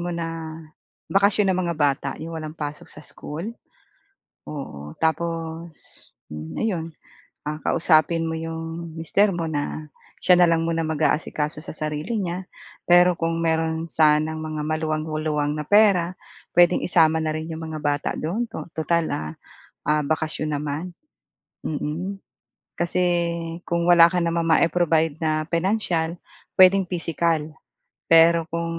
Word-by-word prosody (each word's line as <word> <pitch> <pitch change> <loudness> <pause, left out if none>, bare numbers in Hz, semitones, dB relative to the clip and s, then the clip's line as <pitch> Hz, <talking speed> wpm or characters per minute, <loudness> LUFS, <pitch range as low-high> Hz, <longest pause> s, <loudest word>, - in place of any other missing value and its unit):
mo 175 - -3
na, 165 -2 -4 0.6
bakasyon 200 0 +3
ng 185 - 0
mga 170 -2 -1
bata 145 -2 +1
yong 165 +1 -7
walang 155 +1 -7
pasok 150 0 -6
sa 150 - -12
school. 170 +10 -7 0.9
Oo. 75 - -7
Tapos, 165 0 -2 0.6
hmm, 75 +1 -7
ayon, 165 -7 -2 0.6
ah, 150 - -2
kausapin 165 0 +3
mo 160 - -2
'yong 165 +1 -5
mister 195 +5 +2
mo 170 -2 -2
na, 150 0 -3 0.3
siya 180 - +5
na 175 - +5
lang 165 0 +1
muna 165 0 0
maga-asikaso 150 0 -1
sa - - -7
sarili 155 +8 -3
niya. 180 0 -3 0.4
Pero 175 0 +5
kung 165 0 -1
mayro'n 160 0 0
sanang 155 0 +2
mga 155 -1 -4
maluwang-luwang 155 -1 -1
na 150 - -3
pera, 195 -1 +4 0.4
puwedeng 175 0 +4
isama 160 -2 +3
na 155 - 0
rin 155 +1 -4
'yong 160 0 -6
mga 155 - -5
bata 145 -1 0
do'n, 185 +10 -1 0.3
tutal, 165 +1 +1
ah 75 0 -5 0.5
ah, 150 0 +2
bakasyon 155 0 -1
naman, 150 +5 -4 0.7
mm. 160 +6 -3 0.6
Kasi, 175 +1 -2 0.6
kung 170 0 -1
wala 170 -1 +7
ka 180 - 0
namang 170 -1 0
mai-provide 165 -1 +3
na 155 -1 0
pinansyal, 170 -2 0 0.4
puwedeng 190 +1 +7
pisikal. 170 -1 0 0.7
Pero 165 0 +6
kung 170 0 -2
165 Hz, 135 wpm, -23 LUFS, 155-170 Hz, 0.9 s, wala